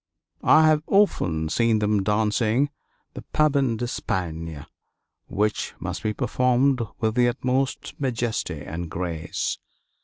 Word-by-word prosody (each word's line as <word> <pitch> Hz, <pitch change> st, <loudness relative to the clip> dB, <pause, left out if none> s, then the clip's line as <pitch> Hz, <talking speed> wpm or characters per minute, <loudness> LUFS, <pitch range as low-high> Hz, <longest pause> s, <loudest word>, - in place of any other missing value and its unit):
I 160 Hz, -, +6 dB
have 155 Hz, -1 st, +4 dB
often 85 Hz, -, +2 dB
seen 115 Hz, +4 st, +2 dB
them 105 Hz, -1 st, +1 dB
dancing 110 Hz, +6 st, +1 dB, 0.4 s
the -, -, -7 dB
Pavane 140 Hz, -6 st, +2 dB
d'Espagne, 80 Hz, -, -3 dB, 0.6 s
which 105 Hz, +1 st, -1 dB
must -, -, -4 dB
be 110 Hz, -, 0 dB
performed 125 Hz, +4 st, +2 dB, 0.2 s
with 110 Hz, -1 st, +1 dB
the 120 Hz, 0 st, +3 dB
utmost 130 Hz, +2 st, -1 dB
majesty 120 Hz, -4 st, -2 dB
and 85 Hz, +1 st, -5 dB
grace. 85 Hz, -2 st, -3 dB
115 Hz, 115 wpm, -24 LUFS, 95-130 Hz, 0.6 s, I